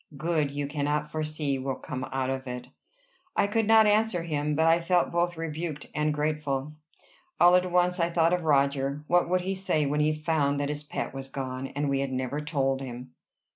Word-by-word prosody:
Good 155 -1 0
you 145 +1 -3
cannot 150 +1 -2
foresee 155 -3 -1
will 135 0 -2
come 130 -2 -5
out 130 0 -2
of 135 0 -4
it." 125 0 -6 0.7
I - - +3
could 210 +1 0
not 220 0 +7
answer 210 -4 +2
him, 150 -2 -1
but 160 +2 +2
I 165 +1 +4
felt 175 +1 +2
both 175 0 0
rebuked 160 -2 -4
and 150 +1 +1
grateful. 150 -1 -2 0.7
All 175 +1 +7
at 180 0 +2
once 180 0 +2
I 170 0 +2
thought 170 0 +2
of 180 - +1
Roger. 140 -1 +1
What 175 +1 +2
would 185 0 +2
he 190 +2 -2
say 185 -6 0
when 145 +2 0
he 150 +1 +3
found 150 -2 0
that 145 0 -1
his 150 0 -4
pet 145 - -4
was 135 0 -6
gone, 130 -1 -4
and 145 +2 -3
we 140 -1 +1
had 135 -1 -2
never 130 +2 -2
told 135 -3 -1
him? 125 -1 -7
150 Hz, 205 wpm, -27 LUFS, 140-170 Hz, 0.7 s, not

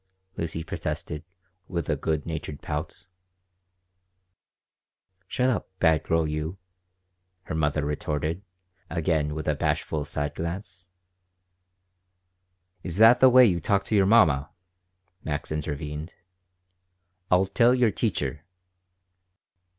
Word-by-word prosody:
Lucy 80 0 -3
protested, 75 -1 -5 0.4
with 85 -4 -3
a - - +1
good 80 -2 -2
natured 75 -3 -5
pout 75 +4 -5 2.2
"Shut 125 +6 0
up, 115 - -3
bad 80 -3 +3
girl 80 -1 +1
you," 75 +4 -3 0.9
her - - -6
mother 75 -1 0
retorted, 75 +3 -2 0.5
again 80 -3 0
with 80 - -5
a 75 - +3
bashful 75 +1 -1
side 75 +1 -3
glance 90 +2 -6 1.9
"Is 90 -1 -4
that 115 +3 +7
the 130 - +8
way 125 0 +8
you 90 -6 +2
talk 100 +4 +1
to 110 - -1
your 95 -2 +4
mamma?" 80 -9 +4 0.7
Max 75 0 -4
intervened. 75 +1 -4 1.1
"I'll 90 +1 +4
tell 120 +5 +4
your 120 -4 +3
teacher." 80 - -2
80 Hz, 110 wpm, -26 LUFS, 75-95 Hz, 2.2 s, the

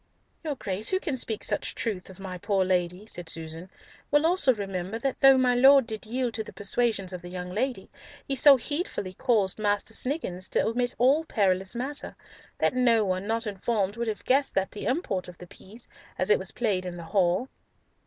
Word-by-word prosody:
"Your 305 -3 -2
Grace, 200 -3 -2
who 375 - +1
can 300 -8 -2
speak 225 -4 -2
such - - 0
truth 200 -6 -3
of 190 0 -13
my 185 -2 -6
poor 195 0 +1
Lady," 180 +1 -1
said 175 -6 -6
Susan, 165 +2 -5 0.4
"will 295 +2 +3
also 335 -5 +4
remember 195 -2 -4
that 265 +3 -2
though 270 -1 +7
my 255 -1 +3
Lord 265 +1 +6
did 220 -2 -6
yield 245 0 -1
to 220 - -3
the - - -10
persuasions 205 -2 -1
of 180 - -6
the 175 - -9
young 180 0 -6
ladies, 250 +7 -2 0.4
he 275 - -1
so 280 0 +7
heedfully 290 - -3
caused 215 -4 +1
Master 205 +1 0
Sniggins 205 - -3
to - - +1
omit 245 +2 0
all 275 +6 +4
perilous 190 -5 0
matter, 270 +5 -5 0.4
that - - +1
no 235 -4 +3
one 185 +1 -2
not 225 +1 -1
informed 205 0 -1
would 235 0 -3
have 215 -1 -4
guessed 270 -2 +2
at 190 0 +1
the 210 - -5
import 245 - -1
of 180 -1 -11
the 180 - -10
piece, 210 +6 -13 0.3
as - - +1
it 440 - +5
was - - -2
played 205 -6 -1
in 180 -1 -6
the 170 - -7
hall." 190 +4 +2
215 Hz, 205 wpm, -27 LUFS, 185-255 Hz, 0.4 s, though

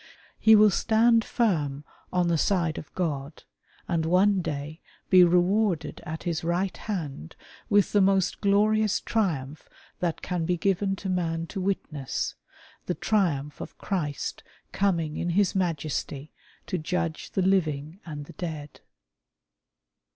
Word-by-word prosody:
He 220 0 +7
will 210 -1 +6
stand 225 +3 +3
firm 150 - 0 0.3
on 180 -1 +1
the 170 - +2
side 170 -4 +1
of 150 - -12
G^d, 150 -4 -3 0.4
and 170 -2 0
one 190 +3 +4
day 150 0 -5 0.3
be 185 -1 +8
rewarded 180 +1 +2
at 160 +1 -5
His 170 -1 -2
Eight 175 +3 -1
Hand 145 - -4 0.3
with 205 -1 +3
the 205 - +4
most 195 -1 +2
glorious 210 +1 +3
triumph 155 - -2 0.3
that 170 -2 -2
can 180 -2 -2
be 175 +2 0
given 195 +2 +1
to 195 - -7
man 165 -3 -1
to 195 - -3
witness 165 -8 -2 0.3
— - - -26
the 180 - -1
triumph 150 -9 0
of - - -8
Christ 155 -8 -3 0.3
coming 170 -6 0
in 175 - -2
His 190 +3 +2
Majesty 155 -5 -2 0.3
to 185 - -2
judge 170 0 -2
the 190 - +1
living 160 -3 0
and 145 -3 -7
the - - -12
dead. 155 -4 -6
175 Hz, 140 wpm, -27 LUFS, 155-195 Hz, 0.4 s, be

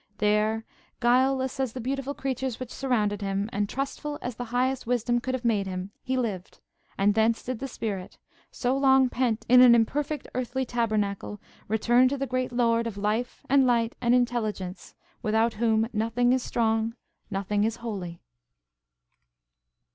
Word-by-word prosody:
There, 215 +1 +1 0.3
guileless 260 +2 +2
as 260 -4 -1
the 260 - -6
beautiful 275 +3 -3
creatures 265 -2 -3
which 255 -2 -7
surrounded 215 -6 0
him, 195 +1 -1
and 205 0 -1
trustful 285 +2 -4
as 245 -2 -5
the 245 - -5
Highest 250 +1 -1
Wisdom 240 0 +1
could 260 +2 -2
have 250 -1 -6
made 210 -4 +1
him, 185 +1 -5
he 260 0 -2
lived; 205 -7 -3 0.4
and 205 +1 +3
thence 220 +1 +2
did 255 -2 -4
the 270 - -4
spirit, 205 -7 -5 0.3
so 250 +1 -1
long 265 -1 +4
pent 240 -3 -1
in 250 +1 +7
an 245 -2 +8
imperfect 290 +5 0
earthly 255 +1 -2
tabernacle, 215 -4 -1 0.3
return 240 +4 +4
to 280 +2 -1
the 275 - -1
great 255 -1 -2
Lord 230 -1 +2
of 215 -3 -6
life 215 +4 -2
and 270 -1 +4
light 235 -2 +2
and 240 0 +4
intelligence, 220 -7 -2 0.3
without 220 +2 +2
whom 225 0 +1
"nothing 230 +3 +2
is 260 - +1
strong, 225 -1 0 0.3
nothing 200 +1 -1
is 225 +1 0
holy." 195 -8 -6
235 Hz, 160 wpm, -27 LUFS, 215-255 Hz, 0.4 s, an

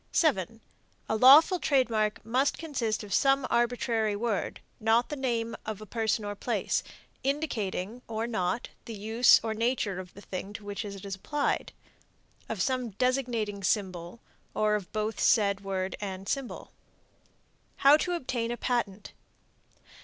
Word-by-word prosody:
7. 225 - +1 0.5
A - - +1
lawful 285 - +8
trademark 225 -9 +1
must 255 +5 +1
consist 245 -10 -2
of 200 -2 -6
some 275 +2 +3
arbitrary 235 -3 +1
word 215 -1 -2 0.2
(not 225 +2 +3
the 295 - -3
name 235 -4 -1
of 215 -2 -5
a 215 - -9
person 220 0 -1
or 205 - -3
place), 205 - -1 0.4
indicating 240 -7 -2
or 225 0 -2
not 220 -1 -1 0.2
the 230 - -6
use 220 +4 +5
or 220 -1 -1
nature 225 -4 0
of 180 -1 -10
the 200 - -11
thing 195 +1 -6
to 210 0 -9
which 205 +1 -4
it 200 -1 -8
is 195 - -4
applied; 285 +10 -1 0.8
of 210 -5 -1
some 255 -2 -1
designating 230 -3 -1
symbol, 185 -1 -1 0.4
or 215 0 +2
of 205 -4 -2
both 215 0 -2
said 200 -3 +3
word 190 -1 -2
and 195 -1 -5
symbol. 275 -3 -4 1.0
HOW 280 +2 +7
TO 355 +3 0
OBTAIN 250 -8 -2
A 240 - -3
PATENT. 215 -6 -2
225 Hz, 145 wpm, -29 LUFS, 205-250 Hz, 1.0 s, lawful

